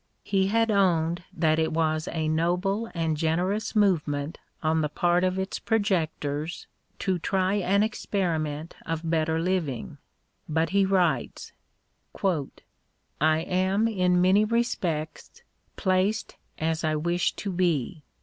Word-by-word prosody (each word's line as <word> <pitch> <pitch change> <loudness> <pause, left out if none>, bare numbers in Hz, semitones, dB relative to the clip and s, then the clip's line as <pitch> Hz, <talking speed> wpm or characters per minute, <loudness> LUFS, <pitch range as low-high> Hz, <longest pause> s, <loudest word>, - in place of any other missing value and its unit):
He 190 -1 +1
had 225 +2 +2
owned 175 -4 +2
that 160 -4 +1
it 160 - +1
was 155 0 0
a 160 -2 -1
noble 180 +7 0
and 165 -2 0
generous 180 +8 -1
movement 155 -7 +1 0.2
on 160 0 +2
the 150 - 0
part 175 +3 +2
of 185 0 +1
its 190 0 -3
projectors 165 -7 -1 0.3
to 185 -2 -1
try 190 +2 0
an 200 +1 +2
experiment 165 -8 -2
of 165 0 -3
better 160 0 +1
living, 165 - -2 0.5
but 160 +1 +1
he 195 0 +3
vsrrites: 190 -2 0 1.7
I 155 +1 +3
am 190 +5 +1
in 180 -5 +2
many 190 +3 +5
respects 205 -9 -2 0.3
placed 190 +3 0 0.2
as 160 +1 -1
I 155 -1 +1
wish 170 +3 0
to 200 - -4
be. 170 -5 0
175 Hz, 125 wpm, -26 LUFS, 160-195 Hz, 1.7 s, many